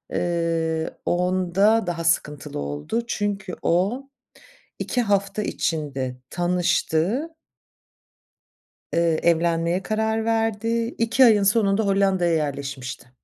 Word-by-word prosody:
ııı, 165 -2 -1
onda 185 +4 +2
daha 170 -1 -2
sıkıntılı 150 -3 -1
oldu 75 - -3
çünkü 200 -4 -2
o 205 +11 0 0.7
2 245 - -1
hafta 200 -2 0
içinde 135 -9 -2
tanıştı 180 - 0 1.6
Eee, 170 -1 +2
evlenmeye 170 +1 +1
karar 220 +1 -1
verdi, 225 +1 0
2 230 +3 +4
ayın 215 -4 +5
sonunda 200 0 +2
Hollanda'ya 195 -3 +2
yerleşmişti. 140 -4 -4
180 Hz, 90 wpm, -23 LUFS, 165-215 Hz, 1.6 s, ayın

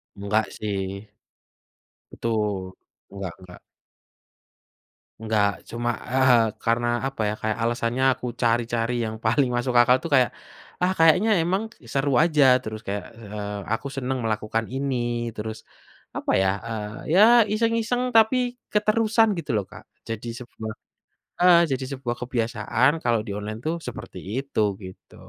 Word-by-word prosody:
Enggak 100 +2 0
sih. 100 -1 -4 1.0
Betul, 105 -5 -2 0.4
enggak 100 -3 -6
enggak. 90 -1 -13 1.6
Enggak 110 -2 +2 0.2
cuma, 120 +1 -2 0.2
eee, 130 -3 +5 0.2
karena 115 +1 +1 0.2
apa 135 -4 -5
ya? - - -1
Kayak 110 0 -1
alasannya 120 +2 0
aku 125 - -9 0.2
cari-cari 115 0 +1
yang 110 0 -4
paling 125 +4 +3
masuk 120 +1 -1
akal 125 +1 +5
itu 165 - -6
kayak, 130 -2 +4 0.5
ah, 180 +1 +3
kayaknya 165 +7 +5
emang 190 +5 0 0.3
seru 140 +1 +1
aja 155 -4 +3 0.2
terus 110 0 -6
kayak, 100 -1 -3
eee, 105 -2 -6
aku 115 +4 -3
senang 135 0 -2
melakukan 110 0 -1
ini 135 +1 -2 0.4
terus, 110 +1 -5 0.6
apa - - -1
ya? 95 - +3 0.2
Eee, 105 0 -6
ya - - +7 0.3
iseng-iseng 230 +2 +1
tapi 225 +3 +5 0.4
keterusan 220 +1 +3
gitu 155 -4 -4
loh 100 - -2
Kak 105 +1 -11 0.3
jadi 115 +1 -4
sebuah, 110 -3 -7 0.7
heeh, 175 -1 +7 0.4
sebuah 125 -3 -4
kebiasaan 120 0 +1
kalau 115 -2 +2
di 105 - -5
online 105 +1 -5
itu 160 - 0 0.2
seperti - - -7 0.2
itu 140 -5 -2 0.2
gitu. 95 0 -12
115 Hz, 135 wpm, -24 LUFS, 105-140 Hz, 1.6 s, ya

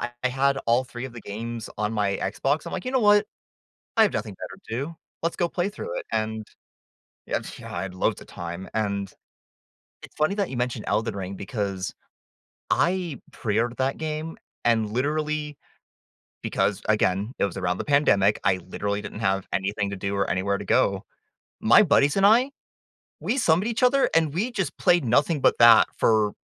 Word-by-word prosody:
I 120 - -3 0.2
had 135 +2 +1
all 120 +2 +4
3 120 0 -7
of 125 - -11
the 120 - -8
games 115 +2 -6
on 105 +1 -1
my 100 -2 0
Xbox. 135 +10 -1
I'm - - -6
like, - - -4
"You - - -1
know 260 - +3
what? 205 -1 +5 0.7
I 220 - +8
have 205 - +2
nothing 105 -4 -3
better - - -9
to 110 - -2
do. 145 +6 -4 0.3
Let's 165 - 0
go 175 -2 +1
play 180 +2 -1
through 475 - -6
it." 480 - -9
And, 110 0 -2 0.8
yeah, - - -1 0.2
I 85 - -4
had 90 - -7
loads 90 - 0
of - - -13
time. 85 +2 -7
And 100 -3 -1 0.9
it's - - -13
funny 155 +6 +1
that 200 -3 -1
you 130 - -5
mentioned 125 -3 -2
Elden 110 +1 0
Ring 95 0 -5
because, 100 -3 -3 0.8
I 175 -5 +1
pre-ordered 115 +3 -1
that 135 +1 0
game 155 +1 -4 0.3
and 115 -2 +2
literally, 150 +3 -1 0.9
because, - - 0
again, 100 +6 +1
it - - +4
was 100 - -7
around 90 -1 -1
the - - -3
pandemic, 105 -9 +3
I 95 -1 +3
literally 100 +2 -2
didn't - - -7
have 95 -2 0
anything 100 +1 -1
to 100 - -4
do 100 +1 -3
or 100 - 0
anywhere 100 +2 0
to - - -6
go. - - +2 0.6
My 120 - +7
buddies 145 -5 +3
and 195 - +4
I, 240 +6 +5 0.7
we 260 - -1
summoned 185 -1 +3
each 235 +1 -2
other, 275 +2 +4
and 160 -3 +3
we 215 +8 0
just 195 -6 -2
played 175 -5 +3
nothing 145 +6 +2
but - - +3
that, 115 -1 +8
for 110 -2 +3
120 Hz, 185 wpm, -25 LUFS, 100-160 Hz, 0.9 s, I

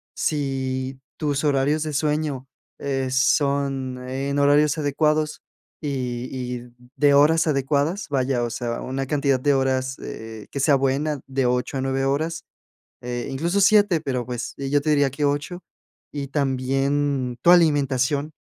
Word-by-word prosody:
Si 135 -2 -2 0.2
tus 145 -2 -1
horarios 145 +1 +2
de 155 - -3
sueño, 150 -2 -1 0.3
eh, 135 -2 -2
son 135 -1 +1
en 140 +2 -2
horarios 145 +1 +4
adecuados 155 +1 0 0.4
y 125 -4 -3
y 125 -1 -5 0.2
de 145 -1 +4
horas 160 +3 +5
adecuadas, 145 +6 0
vaya, 130 -3 0
o 120 - -1
sea, 120 0 -3
una 135 +1 -3
cantidad 140 -2 +1
de 145 +2 +2
horas, 130 0 0
eh, 110 -2 -8
que 140 - -4
sea 140 +1 +4
buena, 140 +2 0
de 135 -1 0
8 125 +2 -1
a - - -1
9 135 0 0
horas, 160 +5 -1 0.6
eh, 120 0 -4
incluso 170 +8 0
7, 205 -4 +5
pero, 130 -5 -2
pues, 125 -1 -5
yo 140 +1 +1
te 155 +2 -1
diría 145 -2 +3
que 140 +3 -3
8, 145 +5 -1 0.5
y 140 -2 -4
también 135 -1 0
tu 170 - +6
alimentación, 145 -3 +3
140 Hz, 145 wpm, -23 LUFS, 130-150 Hz, 0.6 s, tu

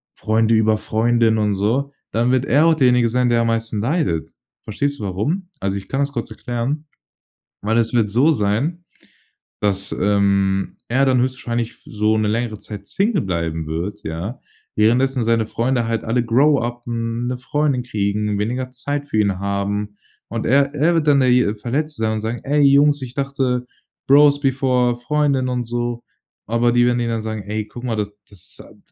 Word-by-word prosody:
Freunde 110 +1 +2
über 110 0 +3
Freundin." 115 0 +2
und 105 -1 +1
so, 125 +8 0 0.2
dann 120 +3 +1
wird 130 0 +2
er 145 +3 +4
auch 165 - +5
derjenige 125 -5 +3
sein, 125 +1 +1
der 115 -1 +3
am 115 - 0
meisten 115 -2 -1
leidet. 135 - -1 0.3
Verstehst 140 +6 -2
du - - -6
warum? 150 - -2
Also 100 0 -2
ich 100 - -8
kann 135 - -2
das 140 0 0
kurz 115 -3 -4
erklären. 125 +7 -3 0.8
Weil 110 +3 0
es 115 -1 +1
wird 115 -3 +3
so 130 +10 +3
sein, 140 +10 -1 0.8
dass, 100 -2 0
ähm, 100 -1 +1
er 130 +4 +2
dann 130 -1 +3
höchstwahrscheinlich 120 -3 -2
f - - -20
so 110 0 +1
'ne 110 - +1
längere 110 0 -2
Zeit 100 -2 -9
Single 200 -4 0
bleiben 80 -3 -2
wird, 90 +7 -4
ja? 85 +10 -5 0.4
Währenddessen 125 +4 +2
seine 115 -1 +2
Freunde 120 +1 0
halt 115 -1 -2
alle 120 +2 0
grow-uppen, 120 -2 0
'ne 125 - -2
Freundin 135 0 0
kriegen, 105 -2 -1
weniger 125 +5 -2
Zeit 145 +3 -4
für 110 - -1
ihn 100 -3 +1
haben. 100 +1 -2 0.3
Und 115 -1 -3
er 140 +3 +3
er 160 +4 +2
wird 160 -2 +1
dann 140 -1 +5
derje 125 -4 +3
Verletzte 135 +5 -3
sein, 110 0 +1
und 110 - -2
sagen: 115 +1 -3
„Ey 145 +2 +1
Jungs, 145 +1 +5
ich 125 -1 -7
dachte, 135 -3 -1 0.4
Bros-before-Freundin." 135 -1 +3
und 125 -1 -1
so. 120 0 -3 0.4
Aber 115 +2 +2
die 120 0 +4
werden 120 0 +1
ihn 120 - -1
dann 115 -1 -2
sagen: 110 -1 -4
„Ey, 105 0 -3
guck 120 +3 -10
mal, 115 -3 -1
das 105 -1 -2 0.5
a - - -16
d - - -23
120 Hz, 180 wpm, -20 LUFS, 105-135 Hz, 0.8 s, auch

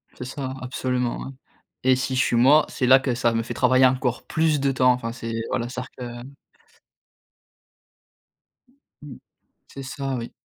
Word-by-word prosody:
C'est 125 - -7
ça, 130 0 -5
absolument, 125 -1 -2
ouais, - - -7 0.5
et 130 0 +4
si 130 0 -2
je - - +1
suis, 120 - 0
moi, 140 +6 +5
c'est 125 - -1
là 130 +1 +8
que 130 -1 -1
ça 120 -1 +1
me 115 0 0
fait - - -6
travailler 130 +1 +4
encore 125 -1 0
plus 155 -2 +1
de 135 0 +1
temps. 125 -1 +4
Enfin 125 -2 -2
c'est 115 -1 -6 0.2
voilà, 120 -1 -2
c'est-à-dire 125 0 -7 0.3
que - - -10 2.7
Mmh, 145 -4 -10 0.5
c'est 135 - -9
ça, 135 0 -4
oui. 120 -1 -6
130 Hz, 165 wpm, -23 LUFS, 125-135 Hz, 2.7 s, là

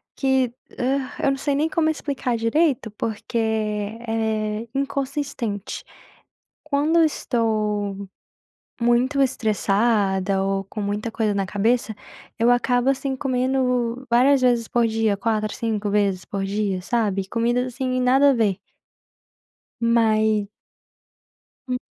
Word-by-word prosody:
que, 265 -3 +1 0.3
hã, 265 +1 0
eu 275 - +4
não 270 - -1
sei 280 +1 -1
nem 300 +3 +1
como 315 -1 +1
explicar 275 -5 -2
direito, 240 +1 +1
porque 220 +2 -4
é 220 0 -1
inconsistente. 275 -6 -3 0.8
Quando 305 +3 +2
eu - - +6
estou 210 -7 -1 0.7
muito 240 +4 +2
estressada, 200 -4 +1
ou 195 0 -1
com 210 +2 -7
muita 205 +3 -2
coisa 215 -2 0
na 195 -1 -1
cabeça, 220 +3 0 0.4
eu 235 +2 +4
acabo, 245 +1 +2
assim, 270 0 -2
comendo 255 -1 0
várias 260 +3 +5
vezes 240 -2 +2
por 240 -1 +2
dia, 220 -2 +1
4, 215 +1 -1
5 215 -3 -2
vezes 200 -3 +1
por 195 -1 -3
dia, 200 -1 -1
sabe? 200 -3 0
Comidas, 240 +2 0
assim, 255 0 -1
nada 265 +3 +5
a - - +3
ver. 210 -6 +1 1.2
Mas 220 -3 +2 1.2
Hum. 250 - -1
230 Hz, 120 wpm, -23 LUFS, 210-255 Hz, 1.2 s, eu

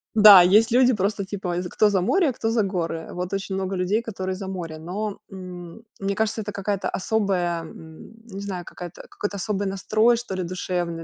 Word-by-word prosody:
Да, 205 -4 +10
есть 210 +5 +5
люди 255 +1 +5
просто 200 -1 -1
типа 190 -3 -4
е 180 - -2
кто 210 +4 +2
за 195 -2 +1
море, 320 - +2
кто 225 -1 -2
за 230 -1 +2
горы. 170 -4 -3
Вот 180 +1 -4
очень 195 0 -3
много 190 0 -2
людей, 185 +5 0
которые 190 -4 -4
за 195 0 -7
море. 170 -4 -5
Но, 195 +5 -4
мм, 180 +1 -9 0.2
мне 195 0 -2
кажется, 220 +1 -1
это 205 0 -5
какая-то 200 0 -2
особая, 185 -5 0
мм, 160 +5 -12
не 195 -3 -8
знаю, 190 -3 -5
какая-то, 175 -2 -9
какой-то 205 -1 -4
особый 200 0 -2
настрой, 215 +5 +2
что 230 -5 -5
ли 185 - -2
душевный, 175 -1 -3
195 Hz, 195 wpm, -24 LUFS, 180-210 Hz, 0.2 s, Да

